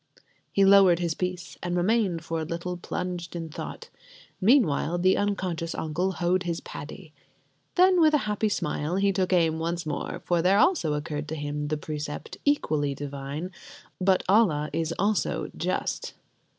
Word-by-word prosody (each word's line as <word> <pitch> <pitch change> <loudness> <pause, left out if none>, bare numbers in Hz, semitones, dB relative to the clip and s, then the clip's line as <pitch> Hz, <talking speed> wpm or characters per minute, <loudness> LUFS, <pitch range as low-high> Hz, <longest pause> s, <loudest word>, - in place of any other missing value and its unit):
He 195 - +4
lowered 195 -3 +7
his 170 -2 -1
piece, 180 0 -4
and 175 0 -2
remained 185 -3 +1
for 165 0 -3
a - - -2
little 170 +2 -4
plunged 175 0 -5
in 165 -1 -4
thought; - - -8 0.5
meanwhile 185 - +3
the 185 +2 +3
unconscious 185 -5 -2
uncle 175 +5 -1
hoed 180 +1 +1
his 170 -2 -2
paddy. 155 +2 -9 0.6
Then 365 -1 +5
with 310 -1 +5
a 275 - 0
happy 210 +1 0
smile 155 -3 -2
he 195 0 +2
took 185 -1 0
aim 165 -3 +3
once 170 +1 -2
more, 155 - -4
for 175 -1 +2
there 185 +3 +4
also 205 - +3
occurred 150 0 -4
to 160 - -4
him 145 0 -3
the 155 +1 -1
precept 150 0 -6
equally 155 - +1
divine: 140 +5 -5 0.5
"But 185 0 +3
Allah 180 -8 +3
is 165 -1 -1
also 210 +1 0
just." - - -2
175 Hz, 160 wpm, -26 LUFS, 155-195 Hz, 0.6 s, lowered